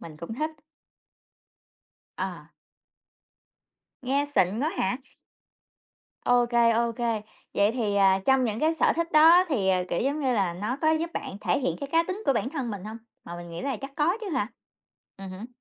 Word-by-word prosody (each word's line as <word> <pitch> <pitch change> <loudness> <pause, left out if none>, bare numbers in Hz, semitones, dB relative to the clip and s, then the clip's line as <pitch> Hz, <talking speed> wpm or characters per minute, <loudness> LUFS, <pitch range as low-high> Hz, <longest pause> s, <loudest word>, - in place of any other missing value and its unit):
mình 160 -2 -10
cũng 170 +7 -7
thích. 310 +6 -2 1.7
À. - - -6 1.5
Nghe 275 +3 +1
xịn 190 +1 +2
quá 305 +4 +1
hả? 195 +6 +1 1.3
Ô 245 -1 +4
kê, 235 -1 +3
ô 235 +1 +1
kê, 230 -2 -1 0.3
vậy 205 +2 +3
thì, 220 -5 -1
à, 195 -1 +4
trong 265 -1 +4
những 220 -1 -2
cái 320 +1 +2
sở - - +3
thích 335 0 -2
đó 330 +4 +7
thì, 215 -11 0
ờ, 185 -1 +2
kiểu 170 - -1
giống 285 +4 0
như 260 -3 +1
là, 190 -5 0
nó 210 +8 -3
có 315 - +4
giúp 330 +2 -1
bạn 195 - -5
thể - - +1
hiện 265 - -1
cái 280 - -4
cá 330 - +5
tính 370 +5 -5
của - - +5
bản 255 +1 -1
thân 270 -6 -3
mình 200 -3 -6
hông? 220 +2 -7 0.3
Mà 170 - -7
mình 175 0 -9
nghĩ 170 - -6
là 275 -1 -2
chắc 275 0 -6
có 330 +6 +2
chứ 430 - -5
hả? 210 -9 -1 0.7
Ừm 195 -1 -8
hứm. 190 +5 -8
240 Hz, 195 wpm, -26 LUFS, 200-295 Hz, 1.7 s, đó